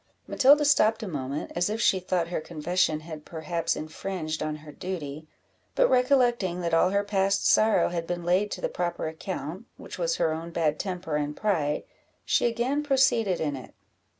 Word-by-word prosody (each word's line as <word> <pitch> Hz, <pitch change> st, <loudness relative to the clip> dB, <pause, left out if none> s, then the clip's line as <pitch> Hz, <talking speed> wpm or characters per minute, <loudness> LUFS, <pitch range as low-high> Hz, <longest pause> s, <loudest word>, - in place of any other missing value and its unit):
Matilda 285 Hz, +3 st, +5 dB
stopped 225 Hz, -6 st, +3 dB
a -, -, -4 dB
moment, 140 Hz, -3 st, -4 dB
as 175 Hz, +3 st, +1 dB
if 215 Hz, +1 st, -2 dB
she 190 Hz, -4 st, +3 dB
thought 180 Hz, -2 st, -1 dB
her 175 Hz, -, -2 dB
confession 160 Hz, 0 st, 0 dB
had 155 Hz, -1 st, -9 dB
perhaps 165 Hz, +1 st, -2 dB
infringed 155 Hz, 0 st, -4 dB
on 155 Hz, 0 st, -2 dB
her 150 Hz, -, -9 dB
duty; 155 Hz, -4 st, -6 dB, 0.5 s
but -, -, +4 dB
recollecting 245 Hz, -8 st, +2 dB
that 170 Hz, -1 st, -2 dB
all 165 Hz, +2 st, +4 dB
her 200 Hz, +1 st, +1 dB
past 195 Hz, -1 st, +1 dB
sorrow 215 Hz, 0 st, +4 dB
had 170 Hz, -1 st, -3 dB
been 175 Hz, -1 st, -3 dB
laid 185 Hz, +4 st, +2 dB
to -, -, -7 dB
the -, -, 0 dB
proper 175 Hz, -2 st, -3 dB
account, 165 Hz, +3 st, -6 dB
which -, -, -9 dB
was -, -, +1 dB
her 160 Hz, -, +1 dB
own 165 Hz, +1 st, -5 dB
bad 160 Hz, -3 st, 0 dB
temper 180 Hz, -5 st, -3 dB
and 150 Hz, 0 st, -3 dB
pride, 160 Hz, -9 st, 0 dB, 0.4 s
she -, -, +2 dB
again 240 Hz, +5 st, 0 dB
proceeded 260 Hz, -9 st, +2 dB
in 145 Hz, -3 st, -1 dB
it. 130 Hz, -, -11 dB
175 Hz, 180 wpm, -27 LUFS, 155-215 Hz, 0.5 s, Matilda